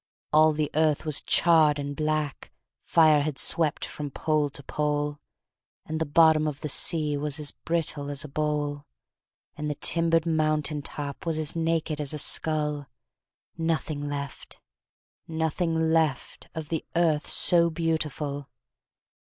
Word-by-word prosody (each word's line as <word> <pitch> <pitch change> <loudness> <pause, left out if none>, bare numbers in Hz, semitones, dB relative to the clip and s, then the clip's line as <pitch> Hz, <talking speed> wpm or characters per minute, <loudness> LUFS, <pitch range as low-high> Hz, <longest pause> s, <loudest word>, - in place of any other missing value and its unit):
All 155 +1 +6
the 150 -1 -2
earth 155 -1 +1
was 150 -2 +1
charred 160 -3 +4
and 145 0 -4
black, 155 -2 -2 0.3
Fire 155 -3 +4
had 145 -1 -3
swept 155 +3 +1
from 150 -1 -6
pole 150 +1 0
to 140 +1 -8
pole; 145 0 -2 0.7
And 160 0 -4
the 160 - 0
bottom 155 0 +5
of 145 -2 -5
the 150 - -3
sea 150 0 +2
Was 150 +1 -2
as 150 -1 -3
brittle 155 -3 -2
as 140 -1 -2
a - - -7
bowl; 145 0 -2 0.7
And 150 0 -4
the 150 - -2
timbered 165 +1 +2
mountain 155 -2 0
top 140 -1 -6
Was 160 -1 0
as 155 0 -2
naked 165 -2 -1
as 145 -1 -4
a - - -3
skull, 150 -1 -1 0.7
Nothing 155 -3 -2
left, 140 -1 -7 0.7
nothing 160 0 0
left, 160 -5 -1
Of 160 -2 -6
the 160 -2 -2
Earth 160 -3 +1
so 170 -1 +4
beautiful! 155 -3 -2
155 Hz, 145 wpm, -26 LUFS, 145-160 Hz, 0.7 s, All